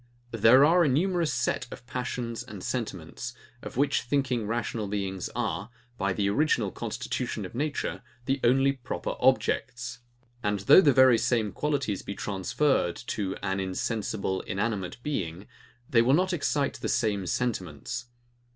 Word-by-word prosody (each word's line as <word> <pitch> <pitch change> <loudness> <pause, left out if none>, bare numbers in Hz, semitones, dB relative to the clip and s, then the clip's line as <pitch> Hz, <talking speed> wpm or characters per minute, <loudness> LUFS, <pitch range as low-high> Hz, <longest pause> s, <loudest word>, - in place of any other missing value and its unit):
There 115 +5 +6
are 170 +3 +5
a - - +3
numerous 170 +3 +1
set 125 - -1
of - - -10
passions 120 -2 -4
and 110 -6 -9
sentiments, 120 0 -4 0.3
of - - -8
which 140 +2 +2
thinking 125 -4 0
rational 110 -1 -2
beings 95 -2 -3
are, 105 -3 -2 0.3
by 100 -1 +1
the 100 +1 0
original 110 -2 +2
constitution - - -3
of - - -9
nature, 145 +3 -2 0.2
the 135 +1 0
only 135 +3 +4
proper 130 -3 -4
objects: 120 +1 +1 0.4
and 105 -2 0
though 100 - +8
the 145 - +5
very 130 -3 +6
same 110 -4 +1
qualities 140 -9 -1
be 100 - -6
transferred 100 - 0
to 100 -5 -2
an 95 -1 -1
insensible, 95 0 -2
inanimate 95 -2 -2
being, 95 - -3 0.4
they 115 - +4
will 130 +4 +4
not 185 +2 +1
excite 145 -3 0
the - - -2
same 105 -6 0
sentiments. 115 +1 -2
115 Hz, 145 wpm, -28 LUFS, 100-135 Hz, 0.4 s, though